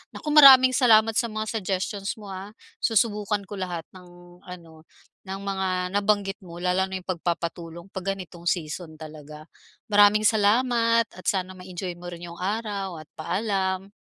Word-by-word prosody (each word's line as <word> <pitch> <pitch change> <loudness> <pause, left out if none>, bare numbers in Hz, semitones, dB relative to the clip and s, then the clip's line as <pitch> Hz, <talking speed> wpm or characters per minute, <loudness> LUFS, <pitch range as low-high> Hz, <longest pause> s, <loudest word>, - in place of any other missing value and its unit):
Naku, 300 - -4
maraming 265 -4 +9
salamat 225 -4 +5
sa 235 - 0
mga 215 0 -3
suggestions 195 +1 -3
mo, 205 -3 -10
ah, 195 +3 -8 0.2
susubukan 210 -2 +1
ko 200 0 -8
lahat 175 -3 -4
ng 175 -1 -16
ano 165 -3 -12 0.4
ng 195 +1 -5
mga 190 -1 -2 0.2
nabanggit 205 -1 0
mo 175 -3 -12
lalo 185 +1 +1
na 190 - -6
yung - - -22
pagpapatulong 170 0 -4
pag 195 +1 -3
ganitong 175 -2 -10
season 160 -1 -3
talaga. 155 -1 -11 0.5
Maraming 205 +1 +5
salamat 230 +2 +3
at 185 - -14
sana 185 -1 0
ma-enjoy 180 -1 -7
mo 175 - -9
rin 175 0 -8
yung 170 - -12
araw 200 -2 -3
at 150 - -32
paalam. 190 +1 -2
190 Hz, 155 wpm, -25 LUFS, 175-210 Hz, 0.5 s, maraming